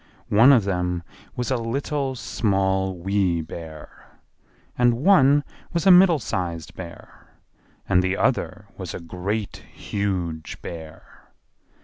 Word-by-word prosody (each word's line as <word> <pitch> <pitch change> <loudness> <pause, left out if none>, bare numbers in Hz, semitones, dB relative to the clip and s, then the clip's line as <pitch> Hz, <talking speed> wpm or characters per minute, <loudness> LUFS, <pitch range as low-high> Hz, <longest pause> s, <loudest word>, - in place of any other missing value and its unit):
One 115 +7 +7
of 120 -6 +5
them 90 -2 -2 0.3
was 125 +1 -3
a 130 - +2
Little, 135 +3 -2
Small, 95 -5 0
Wee 95 -1 0
Bear; 80 -1 -9 0.7
and 120 -1 +3
one 145 -1 +5 0.3
was 170 +1 -1
a 195 - +8
Middle 180 -2 +7
sized 85 - -4
Bear, 85 -3 -11 0.6
and 90 -1 +4
the 95 +1 -1
other - - -1
was - - -5
a - - -5
Great, 95 +5 -4
Huge 90 -6 -4
Bear. 80 -2 -10
95 Hz, 120 wpm, -23 LUFS, 90-125 Hz, 0.7 s, a